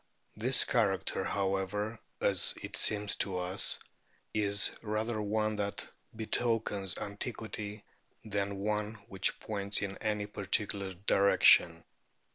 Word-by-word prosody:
This - - +4
character, - - +1
however, 100 +3 -1 0.2
as 95 -3 +2
it - - -4
seems 105 -1 +3
to 95 -2 0
us, 90 +2 0 0.6
is 100 -1 +2
rather 110 +1 -2
one 110 +1 0
that 100 -1 -3 0.3
betokens 110 -3 -1
antiquity 105 0 -6 0.4
than 100 -1 -2
one 105 +1 -1
which 95 -1 0
points 100 -1 -1
in 100 -1 -4
any 105 -2 -1
particular 100 -1 -1
direction. 85 -4 +5
105 Hz, 105 wpm, -32 LUFS, 100-110 Hz, 0.6 s, direction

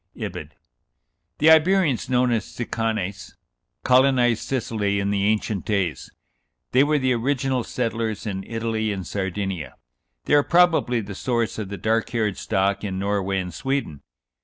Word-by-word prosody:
(Ibid.) - - -6 0.8
The 160 +2 +6
Iberians, 160 -5 +3
known 125 -1 +2
as 115 -2 +1
Sicanes, 110 -4 -3 0.5
colonized 125 -3 +4
Sicily 105 -6 -1
in 100 0 -1
the 100 -1 +1
ancient 105 -2 0
days. 100 -6 -1 0.6
They 130 +2 +5
were 150 +1 +2
the 130 -2 +1
original 130 +1 0
settlers 115 -3 -3
in 95 -2 -3
Italy 115 -1 -2
and 95 -3 -4
Sardinia. 95 -3 -4 0.5
They - - 0
are 145 - +7
probably 165 -8 +3
the 100 -1 -7
source 115 +1 -1
of 105 -3 -5
the 100 - -5
dark 110 +4 0
haired 110 -4 -1
stock 100 -1 0
in 95 -2 -3
Norway 100 0 -1
and 90 -2 -5
Sweden. 135 - -3
110 Hz, 145 wpm, -23 LUFS, 100-130 Hz, 0.8 s, are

